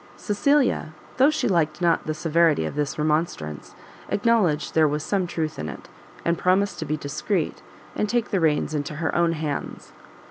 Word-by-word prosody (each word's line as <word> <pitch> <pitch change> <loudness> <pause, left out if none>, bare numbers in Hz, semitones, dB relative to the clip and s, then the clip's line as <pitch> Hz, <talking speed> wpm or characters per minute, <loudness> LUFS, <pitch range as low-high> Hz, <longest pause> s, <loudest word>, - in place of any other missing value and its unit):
Cecilia, 240 - +1 0.2
though 265 +3 +6
she 305 - 0
liked 160 -5 +1
not 170 -3 +1
the 155 - -1
severity 165 - +2
of - - -4
this 145 -1 -2
remonstrance, 150 - -2 0.3
acknowledged 205 -9 +1
there 160 -1 +5
was 150 +1 -2
some 190 -1 0
truth 160 -2 -3
in 75 0 -4
it, - - -10 0.4
and 170 0 +1
promised 190 +2 +2
to 160 - -3
be 155 +1 -1
discreet, 150 +4 -2 0.3
and 210 - -1
take 240 -1 0
the 195 - +2
reins 155 -1 +1
into 150 0 -3
her 160 +1 -2
own 170 -1 +2
hands. 150 -3 -5
160 Hz, 175 wpm, -24 LUFS, 150-190 Hz, 0.4 s, though